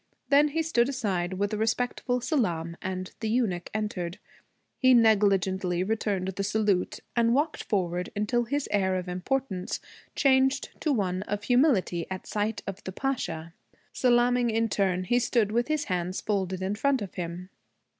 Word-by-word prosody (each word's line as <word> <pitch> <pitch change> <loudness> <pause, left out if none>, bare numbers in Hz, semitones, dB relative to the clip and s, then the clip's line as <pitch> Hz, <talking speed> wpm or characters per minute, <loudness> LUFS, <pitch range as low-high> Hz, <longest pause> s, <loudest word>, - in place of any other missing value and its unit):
Then 290 +1 +6
he 325 +2 -1
stood 260 -6 +2
aside 190 -9 -1
with 200 +2 -1
a - - 0
respectful 245 +2 0
salaam, 175 - -1
and 185 0 -4
the 220 - -2
eunuch 215 -7 0
entered. 200 -5 -3 0.6
He 255 -1 +6
negligently 195 -5 +3
returned 200 -2 -1
the 190 +1 -3
salute 205 -2 0
and 235 0 +3
walked 300 +3 0
forward 180 -3 -1
until 235 +4 0
his 285 +4 -1
air 190 -2 +2
of 180 -1 -3
importance 185 +2 -2 0.4
changed 265 0 +3
to 310 - +1
one 190 -7 0
of 205 0 -3
humility 245 - +2
at 190 -1 -5
sight 210 +1 -2
of 195 0 -6
the 185 - -5
Pasha. 170 -10 -3 0.4
Salaaming 245 -1 +3
in 225 0 +1
turn, 190 -2 +1
he 240 +7 +2
stood 235 -3 +1
with 240 +2 +1
his 310 -1 0
hands 180 -3 -2
folded 190 -3 -2
in 190 +2 -1
front 265 +2 +1
of 195 - -8
him. 175 +1 -5
210 Hz, 160 wpm, -27 LUFS, 185-245 Hz, 0.6 s, Then